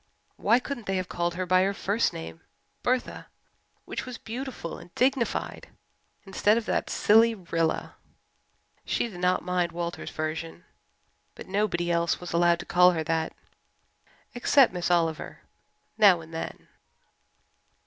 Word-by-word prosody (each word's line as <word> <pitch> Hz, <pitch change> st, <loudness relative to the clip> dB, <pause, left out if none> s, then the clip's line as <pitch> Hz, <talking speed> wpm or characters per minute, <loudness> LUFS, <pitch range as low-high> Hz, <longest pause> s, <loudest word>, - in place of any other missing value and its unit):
Why 235 Hz, -, +3 dB
couldn't 255 Hz, -2 st, -5 dB
they 195 Hz, -, 0 dB
have 185 Hz, -1 st, -2 dB
called 175 Hz, 0 st, -2 dB
her 185 Hz, +1 st, -2 dB
by 185 Hz, +1 st, +4 dB
her 195 Hz, +1 st, +1 dB
first 205 Hz, +5 st, 0 dB
name, 80 Hz, 0 st, -8 dB, 0.4 s
Bertha, 255 Hz, 0 st, -1 dB, 0.6 s
which -, -, -4 dB
was 250 Hz, -2 st, -7 dB
beautiful 245 Hz, -6 st, -6 dB
and -, -, -13 dB
dignified, 260 Hz, -2 st, 0 dB, 0.6 s
instead 205 Hz, +3 st, +2 dB
of 235 Hz, -, -2 dB
that -, -, -1 dB
silly 225 Hz, +2 st, +4 dB
"Rilla"? 165 Hz, -4 st, -2 dB, 0.9 s
She -, -, -1 dB
did 185 Hz, -6 st, -10 dB
not 180 Hz, +1 st, +1 dB
mind 180 Hz, -1 st, 0 dB
Walter's 170 Hz, 0 st, -4 dB
version, 160 Hz, +2 st, -5 dB, 0.7 s
but -, -, -10 dB
nobody 185 Hz, -3 st, 0 dB
else 170 Hz, 0 st, +1 dB
was 180 Hz, -1 st, -7 dB
allowed 170 Hz, 0 st, +4 dB
to -, -, -10 dB
call 180 Hz, +1 st, +5 dB
her 160 Hz, -2 st, -2 dB
that, 160 Hz, 0 st, -1 dB, 1.0 s
except 250 Hz, 0 st, +4 dB
Miss 180 Hz, -1 st, -2 dB
Oliver 165 Hz, -3 st, 0 dB, 0.6 s
now 195 Hz, -5 st, +7 dB
and 165 Hz, 0 st, -12 dB
then. 165 Hz, -, -6 dB
180 Hz, 140 wpm, -27 LUFS, 170-220 Hz, 1.0 s, now